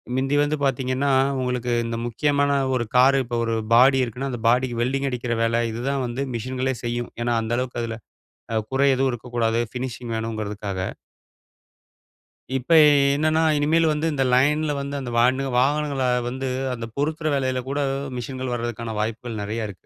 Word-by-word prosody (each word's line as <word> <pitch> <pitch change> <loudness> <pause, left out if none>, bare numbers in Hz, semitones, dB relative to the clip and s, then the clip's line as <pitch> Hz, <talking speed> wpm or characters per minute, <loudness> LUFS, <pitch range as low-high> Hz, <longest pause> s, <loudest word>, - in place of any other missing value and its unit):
மிந்தி 135 +2 0
வந்து 150 +1 0
பார்த்தீங்கன்னா, 135 +1 0 0.3
உங்களுக்கு 125 -1 -2
இந்த 115 0 -3
முக்கியமான 145 +4 +1 0.2
ஒரு 120 - 0
கார் 135 +2 +6
இப்போ 120 -1 -3
ஒரு 115 0 0 0.2
பாடி 130 +2 +6
இருக்குன்னா, 125 +3 -4
அந்த 120 - -5
பாடிக்கு 125 -1 +1
வெல்டிங் 135 +3 0
அடிக்கிற 120 -1 -2
வேல 115 +1 +1
இதுதான் 130 +4 -2
வந்து 120 +3 -3
மிஷின்களே 130 +3 -2
செய்யும். 120 0 -3
ஏன்னா, 120 0 +1
அந்த 115 +1 -2
அளவுக்கு 125 -1 -3
அதில 115 -1 -4 0.6
அ - - +1 0.2
குறை 140 +1 +3
எதுவும் 135 +1 +1
இருக்கக்கூடாது 115 -1 -1
ஃபினிஷிங் 125 -2 -5
வேணுங்கிறதுக்காக. 105 -3 -4 1.8
இப்ப 130 +6 -6
எ - - +8 0.3
என்னன்னா, 155 +2 +2 0.2
இனிமேல் 160 +3 +3
வந்து 150 +1 -1
இந்த 135 -2 +1
லைன்ல 150 +4 +3
வந்து 140 +1 -4
அந்த 125 -3 -5
வான்னு 130 +3 +3
வாகனங்கள 140 0 +1 0.2
வந்து 130 +2 -3 0.3
அந்த 115 -2 -5
பொருத்துற 155 +2 -1
வேலையில 130 -2 0
கூட 140 +1 -1 0.4
மிஷின்கள் 130 +1 -4
வர்றதற்கான 115 -1 -4
வாய்ப்புகள் 110 0 -4
நெறைய 110 +2 -3
இருக்கு. 95 - -13
125 Hz, 155 wpm, -23 LUFS, 115-135 Hz, 1.8 s, எ